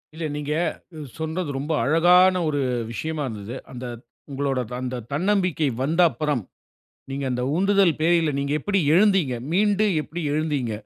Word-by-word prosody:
இல்ல, 160 Hz, 0 st, -4 dB
நீங்க 150 Hz, 0 st, -3 dB, 0.7 s
சொன்னது, 160 Hz, +1 st, -3 dB
ரொம்ப 150 Hz, +4 st, -2 dB
அழகான 175 Hz, +6 st, +5 dB
ஒரு 145 Hz, -1 st, -1 dB, 0.3 s
விஷயமா 155 Hz, +5 st, -3 dB
இருந்தது. 110 Hz, 0 st, -6 dB, 0.2 s
அந்த 125 Hz, -1 st, -7 dB, 0.4 s
உங்களுடைய 135 Hz, -2 st, -1 dB, 0.2 s
அந்த 130 Hz, 0 st, -3 dB, 0.2 s
தன்னம்பிக்கை 180 Hz, -1 st, +1 dB, 0.2 s
வந்த 160 Hz, +6 st, +2 dB
அப்பறம், 150 Hz, -7 st, -2 dB, 0.7 s
நீங்க 135 Hz, +1 st, -3 dB
அந்த 125 Hz, 0 st, -1 dB
உந்துதல் 195 Hz, -2 st, +3 dB
பேர்ல, 165 Hz, -2 st, +3 dB
நீங்க 140 Hz, +1 st, -1 dB
எப்படி 200 Hz, +4 st, 0 dB
எழுந்தீங்க? 190 Hz, -8 st, +3 dB, 0.2 s
மீண்டு 205 Hz, +3 st, +3 dB, 0.2 s
எப்படி 170 Hz, +3 st, -6 dB
எழுந்தீங்க? 150 Hz, -7 st, -1 dB
155 Hz, 135 wpm, -23 LUFS, 140-180 Hz, 0.7 s, அழகான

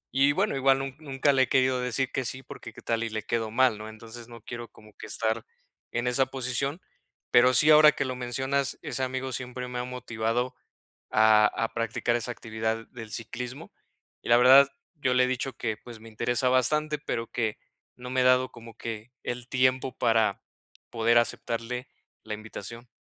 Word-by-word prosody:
y 140 Hz, +2 st, +5 dB
bueno, 190 Hz, +3 st, 0 dB
igual 135 Hz, 0 st, +4 dB
nun 135 Hz, -1 st, -5 dB
nunca 140 Hz, -1 st, +1 dB
le 130 Hz, -1 st, +4 dB
he -, -, -3 dB
querido 130 Hz, -1 st, +2 dB
decir 125 Hz, +1 st, -1 dB
que 130 Hz, -, -1 dB
sí, 130 Hz, +3 st, -3 dB
porque 115 Hz, -, -10 dB
¿qué -, -, -13 dB
tal 115 Hz, 0 st, 0 dB
y 115 Hz, -, -2 dB
le 110 Hz, -1 st, -4 dB
quedo 115 Hz, 0 st, -1 dB
mal, 125 Hz, -1 st, +3 dB
no? 110 Hz, 0 st, -7 dB
Entonces 115 Hz, +2 st, -11 dB
no 115 Hz, -1 st, -11 dB
quiero 120 Hz, +1 st, -7 dB
como 105 Hz, 0 st, -18 dB
que 110 Hz, -, -9 dB
estar 110 Hz, +1 st, -1 dB, 0.5 s
en 120 Hz, +1 st, -2 dB
esa 130 Hz, +2 st, +2 dB
posición, 135 Hz, +5 st, -2 dB, 0.5 s
pero 125 Hz, +1 st, +6 dB
sí 155 Hz, -, +5 dB
ahora 150 Hz, 0 st, +8 dB
que 135 Hz, -, -2 dB
lo 130 Hz, -1 st, -3 dB
mencionas, 130 Hz, +2 st, -1 dB
ese 125 Hz, -, -3 dB
amigo 130 Hz, 0 st, -3 dB
siempre 125 Hz, 0 st, -5 dB
me 125 Hz, 0 st, -4 dB
ha -, -, -2 dB
motivado 120 Hz, 0 st, -2 dB, 0.6 s
a 110 Hz, -1 st, +6 dB
a 115 Hz, -, -2 dB
practicar 115 Hz, +1 st, 0 dB
esa 120 Hz, +1 st, -2 dB
actividad 110 Hz, 0 st, -3 dB
del 115 Hz, -3 st, -10 dB
ciclismo 125 Hz, +3 st, -6 dB, 0.5 s
y -, -, -8 dB
la 120 Hz, -, +7 dB
verdad, 135 Hz, +3 st, +8 dB, 0.3 s
yo 130 Hz, -4 st, 0 dB
le 125 Hz, 0 st, +5 dB
he -, -, +2 dB
dicho 130 Hz, +1 st, -2 dB
que, 110 Hz, -2 st, -2 dB
pues, 115 Hz, +1 st, -12 dB
me 115 Hz, -, -12 dB
interesa 120 Hz, +3 st, 0 dB
bastante, 150 Hz, +5 st, +2 dB
pero 115 Hz, -5 st, -3 dB
que 110 Hz, -3 st, -2 dB, 0.4 s
no 125 Hz, 0 st, -9 dB
me 130 Hz, 0 st, +2 dB
he -, -, +2 dB
dado 130 Hz, 0 st, +4 dB
como 115 Hz, -1 st, -13 dB
que 115 Hz, +1 st, -6 dB
el 120 Hz, 0 st, -5 dB
tiempo 130 Hz, 0 st, +1 dB
para 110 Hz, -3 st, +2 dB, 0.5 s
poder 115 Hz, 0 st, +3 dB
aceptarle 120 Hz, +1 st, -2 dB, 0.4 s
la 110 Hz, -, -6 dB
invitación. 110 Hz, +2 st, -8 dB
125 Hz, 195 wpm, -27 LUFS, 115-130 Hz, 0.6 s, ahora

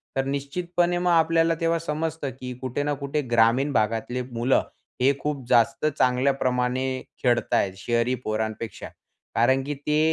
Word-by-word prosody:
तर 135 Hz, 0 st, 0 dB
निश्चितपणे 175 Hz, +6 st, -1 dB
मग 180 Hz, 0 st, +1 dB
आपल्याला 165 Hz, 0 st, +3 dB
तेव्हा 165 Hz, 0 st, +1 dB
समजतं 160 Hz, -2 st, -3 dB
की 125 Hz, 0 st, -5 dB
कुठे 130 Hz, +2 st, -2 dB
ना 145 Hz, 0 st, 0 dB
कुठे 140 Hz, +1 st, -2 dB
ग्रामीण 120 Hz, +5 st, +3 dB
भागातले 115 Hz, +3 st, 0 dB
मुलं, 120 Hz, +3 st, +2 dB, 0.4 s
हे 135 Hz, +2 st, +5 dB
खूप 145 Hz, -4 st, -3 dB
जास्त 120 Hz, +6 st, +3 dB
चांगल्याप्रमाणे 125 Hz, -1 st, +1 dB, 0.4 s
खेळताय 120 Hz, -5 st, +2 dB
शहरी 115 Hz, +5 st, 0 dB
पोरांपेक्षा, 110 Hz, +1 st, -3 dB, 0.5 s
कारण 130 Hz, +3 st, +3 dB
की 145 Hz, +2 st, -3 dB
ते 150 Hz, +2 st, 0 dB
135 Hz, 135 wpm, -25 LUFS, 120-150 Hz, 0.5 s, हे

